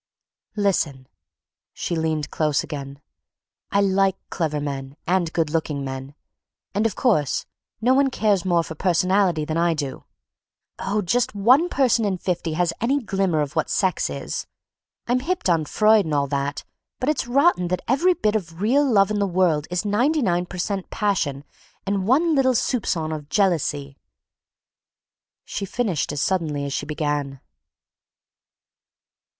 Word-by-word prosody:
"Listen," 170 Hz, -10 st, 0 dB, 0.7 s
she 175 Hz, -, -3 dB
leaned 160 Hz, -2 st, -1 dB
close 150 Hz, -2 st, +1 dB
again, 140 Hz, -1 st, -7 dB, 0.7 s
"I 200 Hz, -, +3 dB
like 195 Hz, -1 st, +2 dB
clever 155 Hz, -4 st, -1 dB
men 140 Hz, -1 st, -5 dB
and 175 Hz, -2 st, +1 dB
good 165 Hz, -3 st, 0 dB
looking 150 Hz, -3 st, -2 dB
men, 135 Hz, +1 st, -6 dB, 0.6 s
and, 210 Hz, +3 st, +2 dB
of 210 Hz, -, -6 dB
course, 195 Hz, -, +1 dB, 0.4 s
no 250 Hz, +3 st, +4 dB
one 270 Hz, +1 st, +3 dB
cares 210 Hz, -7 st, +1 dB
more 175 Hz, -2 st, +2 dB
for 160 Hz, -, -7 dB
personality 180 Hz, -1 st, +2 dB
than 155 Hz, +1 st, -2 dB
I 170 Hz, 0 st, +2 dB
do. 140 Hz, -3 st, -5 dB, 0.7 s
Oh, 205 Hz, +2 st, -1 dB
just 235 Hz, +5 st, 0 dB
one 255 Hz, -, +4 dB
person 250 Hz, -6 st, +2 dB
in 200 Hz, -3 st, 0 dB
fifty 175 Hz, -3 st, -2 dB
has 170 Hz, +1 st, +1 dB
any 265 Hz, +5 st, +2 dB
glimmer 195 Hz, -, 0 dB
of 145 Hz, +2 st, -4 dB
what 160 Hz, -, 0 dB
sex 190 Hz, -2 st, +1 dB
is. -, -, -5 dB, 0.6 s
I'm 245 Hz, +1 st, +1 dB
hipped 345 Hz, -, -2 dB
on 160 Hz, -2 st, +1 dB
Freud 215 Hz, +4 st, +4 dB
and 155 Hz, -2 st, -1 dB
all 140 Hz, -1 st, +2 dB
that, 140 Hz, 0 st, -2 dB, 0.4 s
but 255 Hz, -, -2 dB
it's 300 Hz, -5 st, 0 dB
rotten 270 Hz, -, +3 dB
that 180 Hz, +1 st, -2 dB
every 345 Hz, +9 st, +3 dB
bit 215 Hz, -6 st, 0 dB
of 165 Hz, -5 st, -4 dB
real 250 Hz, +8 st, +3 dB
love 200 Hz, -2 st, +4 dB
in 210 Hz, -, 0 dB
the 200 Hz, -, +1 dB
world 170 Hz, -5 st, +1 dB
is 180 Hz, +3 st, -2 dB
ninety 250 Hz, +9 st, +2 dB
nine 175 Hz, -3 st, +1 dB
per 180 Hz, -, -8 dB
cent 190 Hz, +1 st, -3 dB
passion 165 Hz, -10 st, -1 dB, 0.4 s
and 195 Hz, -1 st, -1 dB
one 315 Hz, +7 st, +3 dB
little 260 Hz, -3 st, +3 dB
soupcon 175 Hz, -10 st, 0 dB
of 150 Hz, -1 st, -9 dB
jealousy." 150 Hz, -8 st, 0 dB, 1.5 s
She 205 Hz, -, -4 dB
finished 195 Hz, -, -1 dB
as 145 Hz, -1 st, -1 dB
suddenly 155 Hz, -7 st, -1 dB
as 140 Hz, -, -4 dB
she -, -, -3 dB
began. 145 Hz, -3 st, -2 dB
180 Hz, 155 wpm, -23 LUFS, 155-215 Hz, 1.5 s, no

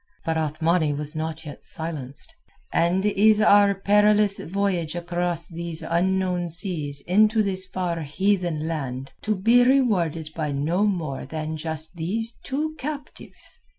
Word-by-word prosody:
But 165 Hz, -, 0 dB
Othmani 160 Hz, 0 st, +1 dB
was 150 Hz, +1 st, -2 dB
not 160 Hz, +1 st, -4 dB
yet 145 Hz, -, -9 dB
silenced. 150 Hz, -5 st, -5 dB, 0.4 s
"And 180 Hz, +4 st, +2 dB
is 210 Hz, +1 st, +4 dB
our 205 Hz, -1 st, +5 dB
perilous 210 Hz, +1 st, +3 dB
voyage 180 Hz, -3 st, -1 dB
across 175 Hz, -1 st, -1 dB
these 170 Hz, -1 st, -6 dB
unknown 180 Hz, 0 st, 0 dB
seas 155 Hz, -5 st, -2 dB
into 215 Hz, +6 st, +3 dB
this 190 Hz, -2 st, -1 dB
far 180 Hz, -3 st, -2 dB
heathen 175 Hz, 0 st, 0 dB
land 135 Hz, -5 st, -4 dB
to 215 Hz, 0 st, 0 dB
be 230 Hz, +6 st, +5 dB
rewarded 185 Hz, -, +2 dB
by 150 Hz, -3 st, -2 dB
no 165 Hz, +9 st, +1 dB
more 160 Hz, -9 st, -3 dB
than 155 Hz, 0 st, -4 dB
just 160 Hz, +1 st, -4 dB
these 220 Hz, +8 st, -1 dB
two 300 Hz, +3 st, -2 dB
captives? 290 Hz, +1 st, -7 dB
175 Hz, 135 wpm, -24 LUFS, 160-200 Hz, 0.4 s, our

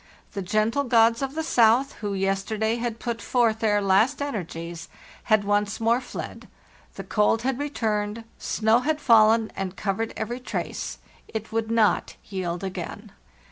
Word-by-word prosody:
The 200 Hz, -, -4 dB
gentle 215 Hz, +8 st, +1 dB
gods 230 Hz, -2 st, +4 dB
of 270 Hz, +1 st, -3 dB
the 320 Hz, -, -1 dB
south, 245 Hz, -1 st, +4 dB
who 205 Hz, -2 st, -2 dB
yesterday 200 Hz, +4 st, 0 dB
had 235 Hz, -1 st, -3 dB
put 235 Hz, -1 st, -4 dB
forth 230 Hz, -3 st, +2 dB
their 210 Hz, -2 st, +2 dB
last 210 Hz, +8 st, +3 dB
energies, 170 Hz, -, -5 dB, 0.4 s
had 215 Hz, -2 st, +3 dB
once 205 Hz, 0 st, 0 dB
more 230 Hz, +2 st, +2 dB
fled; -, -, -8 dB, 0.5 s
the -, -, -6 dB
cold 220 Hz, +2 st, +1 dB
had 265 Hz, 0 st, -1 dB
returned, 220 Hz, -6 st, -2 dB, 0.2 s
snow 220 Hz, +2 st, +2 dB
had 305 Hz, +4 st, -1 dB
fallen 225 Hz, -3 st, +5 dB
and 195 Hz, -1 st, -4 dB
covered 215 Hz, +3 st, -2 dB
every 240 Hz, +3 st, -3 dB
trace: 250 Hz, -, -4 dB, 0.3 s
it 220 Hz, 0 st, -6 dB
would 225 Hz, 0 st, -1 dB
not 225 Hz, -2 st, +2 dB
yield 180 Hz, -2 st, -4 dB
again. 190 Hz, +3 st, -6 dB
220 Hz, 150 wpm, -25 LUFS, 205-235 Hz, 0.5 s, fallen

